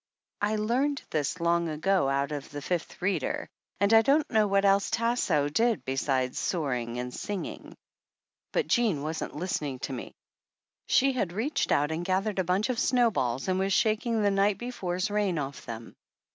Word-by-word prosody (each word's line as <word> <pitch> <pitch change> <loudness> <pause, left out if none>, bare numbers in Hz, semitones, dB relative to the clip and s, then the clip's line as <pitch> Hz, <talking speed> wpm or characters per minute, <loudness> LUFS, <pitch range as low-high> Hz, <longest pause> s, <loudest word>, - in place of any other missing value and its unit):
I 210 +1 +1
learned 255 +7 0
this 155 +3 -1
long 170 0 +1
ago 160 0 +1
out 140 +1 0
of 145 -2 -5
the 145 0 -6
Fifth 175 +1 -3
Reader, 185 -7 -1 0.3
and 200 +2 +3
I 225 - +8
don't 280 +5 +3
know 215 -2 +4
what 200 0 +2
else 195 0 +3
Tasso 225 -11 +1
did 225 +10 +1
besides 130 -1 0
soaring 125 -8 -2
and 125 0 -4
singing. 205 -3 -5 0.8
But 485 - +1
Jean 215 - +1
wasn't 160 +1 -4
listening 150 -5 -2
to 135 - -4
me. 125 - -7 0.7
She 270 0 +4
had 200 -9 -1
reached 240 +10 -1
out 145 +2 +2
.and 160 +2 -2
gathered 190 +3 0
a - - +3
bunch 185 +6 0
of 250 -2 -1
snowballs 205 - +1
and 185 0 +1
was 195 0 +1
shaking 220 0 +1
the 205 - +3
night 195 0 +2
before's 195 -6 -3
rain 205 -4 +1
off 140 -2 -5
them. 115 0 -7
190 Hz, 170 wpm, -28 LUFS, 145-215 Hz, 0.8 s, I